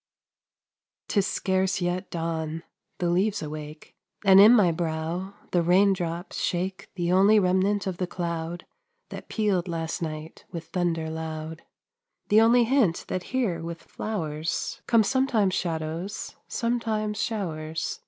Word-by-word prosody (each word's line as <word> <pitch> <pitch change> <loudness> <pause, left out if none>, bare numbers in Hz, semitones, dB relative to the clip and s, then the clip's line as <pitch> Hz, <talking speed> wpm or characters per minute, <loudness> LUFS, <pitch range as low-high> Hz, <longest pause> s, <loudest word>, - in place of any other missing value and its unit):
'Tis 200 -3 +2
scarce 190 0 0
yet 180 +1 -2
dawn, 165 -1 -3 0.3
the 175 - 0
leaves 190 +2 +1
awake, 150 0 -8 0.3
And 190 0 +8
in 210 +3 +10
my 205 -8 +5
brow 165 +4 -3 0.2
the 175 - +3
raindrops 180 -1 +1
shake 185 +2 -2
The 175 -1 0
only 200 +4 +6
remnant 195 +1 +2
of 185 -3 -3
the 180 - -2
cloud 170 0 -4 0.4
That - - -9
pealed 200 -5 0
last 165 -1 -3
night 155 -1 -6
with 165 -1 -6
thunder 170 -3 -1
loud; 160 0 -5 0.7
The 215 +2 +6
only 235 +2 +5
hint 230 -8 +2
that 185 - -3
here 225 -11 0
with 165 0 -6
flowers 160 -8 -3
Come 230 -2 +5
sometimes 235 -5 +2
shadows, 165 +3 -3
sometimes 220 -3 -1
showers. 160 -7 -3
180 Hz, 130 wpm, -26 LUFS, 165-205 Hz, 0.7 s, in